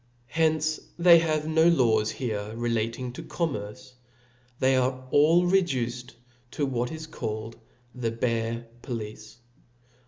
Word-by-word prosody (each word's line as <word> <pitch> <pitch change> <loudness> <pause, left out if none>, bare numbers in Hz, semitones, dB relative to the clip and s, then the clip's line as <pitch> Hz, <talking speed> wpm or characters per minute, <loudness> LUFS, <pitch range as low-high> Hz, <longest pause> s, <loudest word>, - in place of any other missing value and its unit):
Hence 155 -1 +1 0.2
they 170 -1 +7
have 155 -2 0
no 160 +1 +4
laws 115 -10 +3
here 110 -5 -4
relating, 115 +1 -2
to - - -7
commerce, 135 -6 -4 0.7
they 130 0 +3
are 130 0 0
all 165 +5 +5
reduced 125 -10 0 0.3
to 145 - -2
what 125 -2 -2
is 160 0 -6
called 110 -7 -5 0.4
the 125 -3 -2
bare 115 0 -2 0.2
police. 110 -3 -7
125 Hz, 120 wpm, -27 LUFS, 115-155 Hz, 0.7 s, they